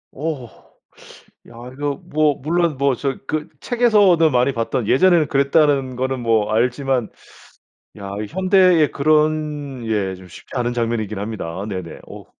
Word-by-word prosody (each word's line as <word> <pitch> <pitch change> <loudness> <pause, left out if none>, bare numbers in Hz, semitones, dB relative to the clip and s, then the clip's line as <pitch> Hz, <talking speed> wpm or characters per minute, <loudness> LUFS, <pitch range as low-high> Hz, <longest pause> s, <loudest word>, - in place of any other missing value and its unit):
오. 150 -3 -4 1.0
야 - - -15 0.2
이거 145 +1 -3
뭐 150 -1 +1
물론 165 +1 -1
뭐 140 -1 +1
저 135 +2 -3
그 155 -1 -2
책에서도 205 -9 +3
많이 125 +2 +2
봤던 115 -1 -2
예전에는 170 +1 +4
그랬다는 140 -2 +2
거는 130 +1 -2
뭐 110 -3 +1
알지만 125 +1 0 0.9
야 100 -1 -7
이 105 - -5
현대에 185 - +3
그런 150 -3 0
예 100 -4 -1
쉽지 90 +6 -14
않은 120 -1 -1
장면이긴 115 -4 -2
합니다. 100 -3 -5
네네. 95 -5 -6
오. - - -11
135 Hz, 260 characters per minute, -20 LUFS, 115-155 Hz, 1.0 s, 예전에는